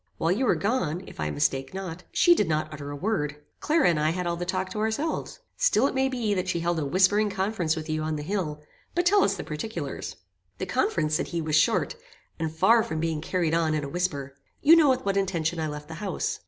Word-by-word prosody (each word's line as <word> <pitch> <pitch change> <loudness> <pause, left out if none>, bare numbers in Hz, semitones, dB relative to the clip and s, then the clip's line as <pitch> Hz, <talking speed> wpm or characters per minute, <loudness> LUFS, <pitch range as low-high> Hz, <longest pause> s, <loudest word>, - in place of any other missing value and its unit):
While 165 - +1
you 245 +7 +1
were - - +4
gone, 195 -6 -1
if - - -13
I 75 0 -1
mistake 135 - -1
not, 180 -2 -6
she 350 - +5
did 340 - +1
not 155 0 -1
utter 145 -1 -7
a 145 - -5
word. 150 -4 -1 0.2
Clara 315 0 +3
and 165 -3 +2
I 155 +1 +2
had 180 +2 -2
all 170 0 0
the 175 +1 -5
talk 185 0 -2
to 210 - -4
ourselves. 280 - -2 0.2
Still 220 +5 +3
it - - +1
may 265 0 +1
be 235 -5 -1
that 185 -1 -1
she 175 -2 0
held 170 0 0
a 150 - -1
whispering 195 +7 +3
conference 190 -5 -1
with 155 -1 -5
you 155 0 -1
on 155 0 -2
the 150 - -4
hill; 155 -5 -3 0.3
but 350 0 +1
tell 400 +3 +5
us 200 - +2
the - - -5
particulars." 150 -2 -5 0.4
"The - - -3
conference," 155 -2 0
said 155 - 0
he, 170 - -3
"was 155 -2 -1
short; 155 - +2 0.4
and 160 -1 -1
far 225 +9 +4
from 160 -6 -3
being 160 -1 -1
carried 165 -1 0
on 160 -2 +2
in 150 - -1
a 140 - -4
whisper. 145 -5 -2 0.3
You 320 +3 +8
know 315 -4 +5
with 260 -3 +1
what 200 0 +1
intention 175 -4 0
I 160 - -1
left 150 0 -6
the 160 - -8
house. 195 -5 -2
175 Hz, 245 wpm, -26 LUFS, 155-205 Hz, 0.4 s, You